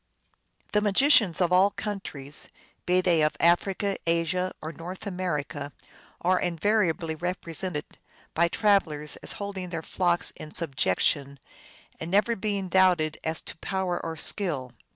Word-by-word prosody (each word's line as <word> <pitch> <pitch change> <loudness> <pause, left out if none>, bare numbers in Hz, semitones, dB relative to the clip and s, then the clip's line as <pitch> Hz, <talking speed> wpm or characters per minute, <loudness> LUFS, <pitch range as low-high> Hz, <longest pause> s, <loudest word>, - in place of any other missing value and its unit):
The 210 - +3
magicians 210 - +4
of 175 0 +2
all 190 +2 +6
countries, 175 -10 -6 0.4
be 180 +1 +4
they 175 -3 +3
of 150 0 +1
Africa, 190 +4 +2
Asia, 170 +2 +1
or 155 - -6
North 175 +6 -8
America, 150 -7 -3 0.5
are 185 +1 +3
invariably 175 -2 +1
represented 170 -1 -4 0.5
by 170 +1 +3
travelers 170 -7 +1
as - - -2
holding 195 -3 -5
their 165 -2 -4
flock 175 0 0
in 155 - -10
subjection, 140 - 0 0.6
and 160 - -5
never 210 +5 +3
being 200 -2 -2
doubted 180 -4 +3
as 160 0 -1
to - - -7
power 185 -1 -2
or 165 0 -4
skill. 150 -8 -1
175 Hz, 130 wpm, -27 LUFS, 160-190 Hz, 0.6 s, all